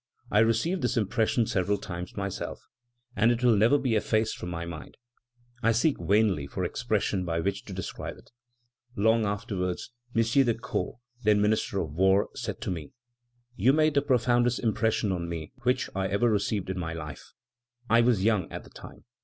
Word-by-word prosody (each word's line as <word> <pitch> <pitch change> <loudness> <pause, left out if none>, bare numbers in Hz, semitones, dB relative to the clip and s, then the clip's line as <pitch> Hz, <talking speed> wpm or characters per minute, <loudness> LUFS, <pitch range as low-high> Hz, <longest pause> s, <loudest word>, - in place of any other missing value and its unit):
I 105 - +4
received 115 - +2
this 125 -1 0
impression 110 +2 +1
several 100 0 0
times 90 -1 -7
myself, 100 -1 -5 0.5
and 115 - +4
it 120 +1 -1
will 120 -3 +5
never 115 +8 +5
be 130 -4 0
effaced 110 +1 +1
from 90 - -6
my 85 -1 -4
mind; 85 -2 -9 0.6
I 115 - +3
seek 135 +6 +2
vainly 100 -8 +2
for 90 +6 -4
expressions 105 -1 -1
by 85 -2 -1
which 100 +3 -2
to 100 - -8
describe 95 -1 -6
it. - - -19 0.6
Long 110 +1 +3
afterwards, 100 -1 -3 0.2
M. 115 - +4
de 115 0 +3
Caux, 115 +1 -4 0.2
then 105 -2 +4
Minister 105 -1 +1
of 75 -3 -5
War, 95 +4 +3
said - - -5
to - - -2
me: 80 -5 -6 0.6
'You 120 +7 +4
made 155 0 +3
the 140 - +3
profoundest 120 -2 +2
impression 110 -2 +1
on 85 -2 -3
me 80 -2 -5
which 125 +1 +1
I 95 0 0
ever 100 +5 +2
received 100 -2 0
in 95 - -4
my 80 -2 -3
life. 75 -4 -8 0.5
I 115 +2 +5
was 115 -5 +2
young 105 -5 +1
at - - -6
the - - -16
time. - - -12
105 Hz, 180 wpm, -28 LUFS, 95-115 Hz, 0.6 s, will